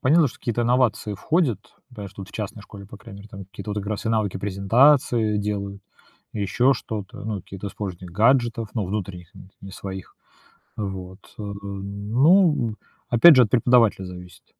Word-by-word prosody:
понятно, 155 +4 +4
что - - -15
какие-то 120 0 -2
инновации 120 -3 +1
входят, 140 - 0 0.3
да. 105 -5 -8
Что 100 +1 -10
вот 95 - -11
в - - -16
частной 105 -1 -6
школе, 100 -2 -12
по 105 - -12
крайней 105 -2 -12
мере, 105 - -13
там, 100 -3 -9
какие-то 100 +2 -7
как 100 -1 -4
раз 105 +1 -4
и - - +1
навыки, 110 -4 0
презентации 110 +3 +3
делают, 100 -1 -4 0.5
еще 120 +6 +2
что-то. 105 -3 -7
Ну, 105 -3 -3
какие-то 95 +1 -7
сложные 95 -3 -7
гаджетов, 115 +2 +2
ну, 105 -5 -1
внутренних, 90 -4 -6
н 95 - -14
не 95 - -10
своих. 95 -1 -8 0.6
Вот, 95 -2 -6 0.2
э. - - -4
Ну, 105 - +1 0.3
опять 135 +7 +8
же, 125 - +7
от 105 - -2
преподавателя 115 -5 +3
зависит. 90 0 -11
105 Hz, 170 wpm, -23 LUFS, 100-120 Hz, 0.6 s, опять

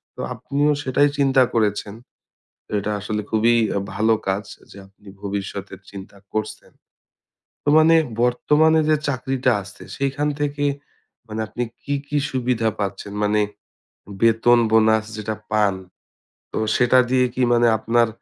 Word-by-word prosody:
তো - - -16
আপনিও 145 +2 0
সেটাই 140 +2 +2
চিন্তা 135 -2 +4
করেছেন। 105 -2 0 0.8
এটা 100 +1 -2
আসলে 105 +1 -3
খুবই 110 +2 +3 0.2
আ - - +1
ভালো 110 +3 +2
কাজ 95 +2 -1 0.3
যে - - -13
আপনি 100 +1 -23
ভবিষ্যতের 100 -1 -5
চিন্তা 100 0 -11 0.2
করছেন। 110 0 -4 0.9
তো - - -2
মানে 160 +1 +5 0.3
বর্তমানে 150 +6 +3
যে 155 - +4
চাকরিটা 130 -1 0
আছে 100 - -13
সেইখান 140 +2 -1
থেকে 145 0 -1 0.6
মানে 110 0 -4
আপনি 120 - -5 0.2
কী, 145 - -2
কী 150 - 0
সুবিধা 125 -3 0
পাচ্ছেন? 100 0 -4
মানে 105 +1 +2 0.8
বেতন-বোনাস 110 -1 +4
যেটা 110 0 -4 0.2
পান, 105 -2 +2 0.8
তো - - -4 0.2
সেটা 125 +1 +4
দিয়ে 130 0 +3
কি 130 - -2
মানে 120 0 +4
আপনার, 115 +1 +2
115 Hz, 130 wpm, -21 LUFS, 105-135 Hz, 0.9 s, মানে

